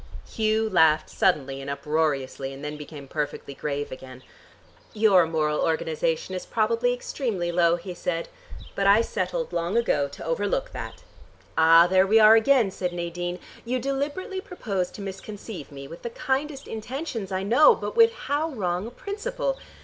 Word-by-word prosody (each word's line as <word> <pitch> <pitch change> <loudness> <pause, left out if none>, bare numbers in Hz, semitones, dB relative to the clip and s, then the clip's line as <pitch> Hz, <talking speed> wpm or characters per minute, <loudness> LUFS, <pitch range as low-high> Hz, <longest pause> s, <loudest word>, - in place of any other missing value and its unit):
Hugh 220 0 +1
laughed 160 -6 +3
suddenly 135 -7 +1
and 135 - -6
uproariously 140 -2 -1
and 135 +2 -8
then 150 0 -4
became 150 -1 -9
perfectly 145 -1 -4
grave 145 +1 -4
again. 130 -1 -10 0.7
"Your 200 -6 +5
moral 155 -2 0
organization 160 +2 -1
is 185 - -4
probably 230 +2 +1
extremely 230 -8 -2
low," 170 -1 +3
he 180 +1 -7
said. 170 -1 -3 0.5
"But 195 - 0
I 205 +3 +6
settled - - -3
long 170 +5 0
ago 145 -12 +2
to 140 - -10
overlook 205 - -1
that." - - -8 0.5
"Ah, 165 +1 +7
there 185 +1 +4
we 220 +3 +5
are 215 0 +8
again," 225 -2 +4
said 180 -1 -3
Nadine. 175 +1 -4 0.3
"You 245 +2 -1
deliberately 285 - -3
propose 200 - -3
to - - -10
misconceive 195 -3 -8
me, 140 -1 -9
with 165 +4 -11
the 235 - -4
kindest 275 +2 -2
intentions 225 - -5
I 190 0 -1
know, 290 - +6
but - - -5
with 460 0 +6
how 305 -6 -2
wrong 185 - -2
a - - -6
principle. - - -4
190 Hz, 160 wpm, -25 LUFS, 160-235 Hz, 0.7 s, are